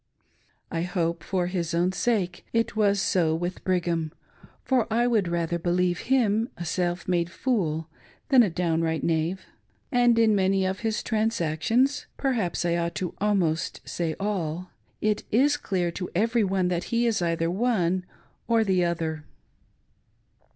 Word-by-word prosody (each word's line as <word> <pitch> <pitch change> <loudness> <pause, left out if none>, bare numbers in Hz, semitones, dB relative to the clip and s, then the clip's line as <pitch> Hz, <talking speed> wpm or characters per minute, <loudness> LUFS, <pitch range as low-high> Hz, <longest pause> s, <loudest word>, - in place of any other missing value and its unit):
I 165 - -1
hope, 170 -2 -1
for 180 0 -1
his 175 -2 -2
own 175 +2 +2
sake, 190 -4 -1
it 230 0 0
was 205 -2 +3
so 165 -4 +2
with 175 +2 -4
Brigham, 170 -4 0 0.5
for 245 -4 +1
I 235 +2 +3
would 220 -6 +2
rather 170 0 -1
believe 175 0 +1
him 230 -3 +2
a 175 - -5
self 175 +1 -1
made 175 -2 +1
fool 170 -8 -1 0.4
than 265 -3 +7
a 215 - +3
downright 165 -2 0
knave; 165 +3 0 0.5
and 245 -2 +4
in 225 -1 +5
many 190 -1 +2
of 190 +1 -2
his 220 -2 -1
transactions 225 - +1
— - - -42
perhaps 225 - -1
I 170 0 +1
ought 170 0 -2 0.2
almost 185 -6 0
to - - -10
say 165 -2 -2
«// 185 -4 -3 0.2
— - - -41
it 210 - -3
is 280 +6 +3
clear 180 -10 -1
to 180 +1 -5
every 225 +4 +2
one 190 -1 +1
that 175 -1 -1
he 235 0 +1
is 225 -4 +1
either 165 -1 0
one 185 -4 +1 0.4
or 230 -1 +3
the 190 -3 +2
other. 160 -3 -2
180 Hz, 160 wpm, -26 LUFS, 170-220 Hz, 0.5 s, than